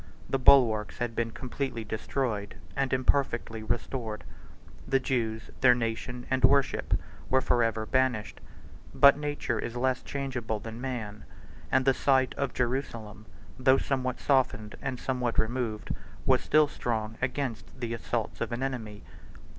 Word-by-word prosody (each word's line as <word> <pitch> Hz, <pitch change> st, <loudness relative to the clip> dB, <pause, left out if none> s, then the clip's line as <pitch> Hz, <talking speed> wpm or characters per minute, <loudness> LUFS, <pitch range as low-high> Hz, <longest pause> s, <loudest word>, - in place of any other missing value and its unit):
The 135 Hz, -, 0 dB
bulwarks 120 Hz, -6 st, +5 dB
had 120 Hz, -2 st, -2 dB
been 115 Hz, 0 st, 0 dB
completely 125 Hz, 0 st, -4 dB
destroyed 110 Hz, -1 st, -2 dB, 0.2 s
and 135 Hz, -1 st, 0 dB
imperfectly 130 Hz, -4 st, +1 dB
restored: 110 Hz, 0 st, -3 dB, 0.6 s
the 135 Hz, 0 st, +3 dB
Jews, 115 Hz, -4 st, -2 dB
their 125 Hz, -2 st, +7 dB
nation, 120 Hz, +1 st, -3 dB
and 130 Hz, 0 st, +1 dB
worship, 140 Hz, -1 st, +3 dB, 0.3 s
were 130 Hz, -, +4 dB
forever 115 Hz, -4 st, +1 dB
banished; 125 Hz, -2 st, 0 dB, 0.5 s
but 140 Hz, 0 st, +8 dB
nature 145 Hz, -5 st, -2 dB
is 115 Hz, -, -4 dB
less 130 Hz, +1 st, +1 dB
changeable 125 Hz, -6 st, -3 dB
than 115 Hz, +2 st, -8 dB
man, 110 Hz, -5 st, -5 dB, 0.5 s
and 130 Hz, 0 st, +3 dB
the 135 Hz, -, +5 dB
site 130 Hz, 0 st, +2 dB
of 140 Hz, -2 st, -2 dB
Jerusalem, 115 Hz, -4 st, -3 dB, 0.3 s
though 130 Hz, +1 st, +5 dB
somewhat 130 Hz, -2 st, -1 dB
softened 125 Hz, -6 st, +1 dB
and 130 Hz, -2 st, -3 dB
somewhat 125 Hz, -3 st, -1 dB
removed, 110 Hz, -2 st, -1 dB, 0.3 s
was -, -, +4 dB
still 155 Hz, -1 st, +4 dB
strong 110 Hz, -5 st, -3 dB
against 125 Hz, -2 st, -3 dB
the 120 Hz, -2 st, -3 dB
assaults 115 Hz, 0 st, -3 dB
of 115 Hz, -, -1 dB
an 120 Hz, +2 st, -2 dB
enemy. 110 Hz, -6 st, -4 dB
125 Hz, 140 wpm, -29 LUFS, 110-130 Hz, 0.6 s, but